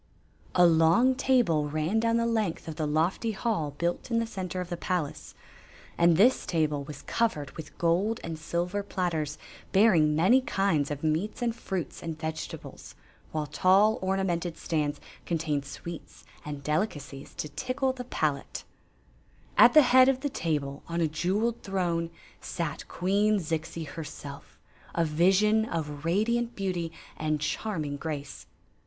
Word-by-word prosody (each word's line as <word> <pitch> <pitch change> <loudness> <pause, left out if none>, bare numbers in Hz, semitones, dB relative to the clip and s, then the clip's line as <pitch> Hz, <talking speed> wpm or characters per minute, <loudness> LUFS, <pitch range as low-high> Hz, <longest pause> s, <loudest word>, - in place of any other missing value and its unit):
A 180 - +7
long 165 +10 +5
table 240 - +2
ran 155 +8 0
down 230 0 +2
the 230 - +1
length 220 -9 -1
of 160 - -5
the 155 - -1
lofty 170 +9 0
hall 190 - -1
built 170 +7 -2
in 230 - +1
the 230 - +1
center 185 -4 -5
of 180 -1 -4
the 175 - -2
palace; 170 -3 -3 0.6
and 170 -1 +4
this 245 +7 +4
table 150 -4 0
was 145 0 -9
covered 220 -12 -1
with 160 - -10
gold 185 +7 +1
and 165 -1 -5
silver 175 +5 -2
platters 170 -7 -2 0.3
bearing 180 -7 +5
many 190 +12 +5
kinds 195 - +1
of 145 0 -5
meats 165 +10 -1
and 235 -1 0
fruits 190 -7 -4
and 165 -2 -5
vegetables, 160 0 -6 0.4
while 155 -1 -2
tall, 195 +8 +4
ornamented 185 -3 -1
stands 150 -3 -1 0.3
contained 155 -4 -1
sweets 170 +4 -9 0.2
and 145 -2 -6
delicacies 145 -4 -3
to - - -3
tickle 255 - -1
the 250 -1 -7
palate. 150 - -2 0.9
At - - +7
the 305 - +10
head 255 +1 +6
of 260 -1 0
the 285 - -1
table, 145 - -2
on 170 0 -2
a 165 - +3
jeweled 195 +9 -1
throne, 175 -4 -1 0.3
sat 165 -5 -4
Queen 205 +4 +2
Zixi 165 -1 -3
herself, 145 -2 -9 0.4
a 170 - +2
vision 190 +7 +3
of 150 -8 -4
radiant 235 +7 +1
beauty 180 -4 -2 0.3
and 155 -1 0
charming 155 -2 -2
grace. 145 -2 -6
170 Hz, 150 wpm, -28 LUFS, 155-210 Hz, 0.9 s, the